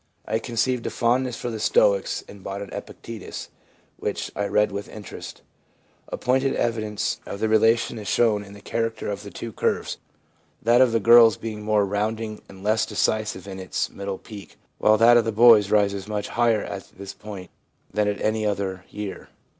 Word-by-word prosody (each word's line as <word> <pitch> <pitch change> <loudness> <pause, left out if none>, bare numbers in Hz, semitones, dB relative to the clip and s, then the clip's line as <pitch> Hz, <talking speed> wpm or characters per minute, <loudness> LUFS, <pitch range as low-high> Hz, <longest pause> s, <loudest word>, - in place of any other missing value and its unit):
I 110 +1 0
conceived 120 +1 -1
a - - 0
fondness 125 +1 0
for 120 - -4
the 110 - -5
Stoics - - +2
and 100 -2 -13
bought 100 +1 -5
an 100 - -11
Epictetus, 115 -4 -8 0.5
which - - -3
I 100 - -1
read 105 0 +2
with 100 +1 -5
interest/ 105 -2 -9 0.6
A - - -5
pointed 130 +2 +1
evidence 110 -3 -1
of 100 - -6
the 110 - +1
relation 115 +1 +3
is 105 - -8
shown 105 -2 +2
in 100 0 -13
the 100 - -12
character 115 -1 -2
of 100 0 -5
the 105 - -9
two 115 +3 -7
curves, - - -1 0.6
that 120 +2 +4
of 130 -2 +5
the 115 - +2
girls 115 0 +7
being 110 -2 -6
more 105 -1 +2
rounding 110 +2 -2
and 95 0 -13
less 110 +1 +2
decisive 105 -2 -1
in 95 -1 -7
its 95 -1 -2
middle 100 -1 -5
peak, 100 -1 -12 0.2
while 110 0 +5
that 120 +2 +7
of 120 - +4
the 115 - 0
boys 110 -2 +7
rises 100 -2 +1
much 105 -1 -3
higher 115 -3 +2
at 100 -1 -7
this 100 0 -7
point 100 -4 -9 0.4
than 105 0 +1
at 105 - -1
any 110 0 0
other 95 -3 -2
year. 105 -1 -7
105 Hz, 185 wpm, -24 LUFS, 100-115 Hz, 0.6 s, girls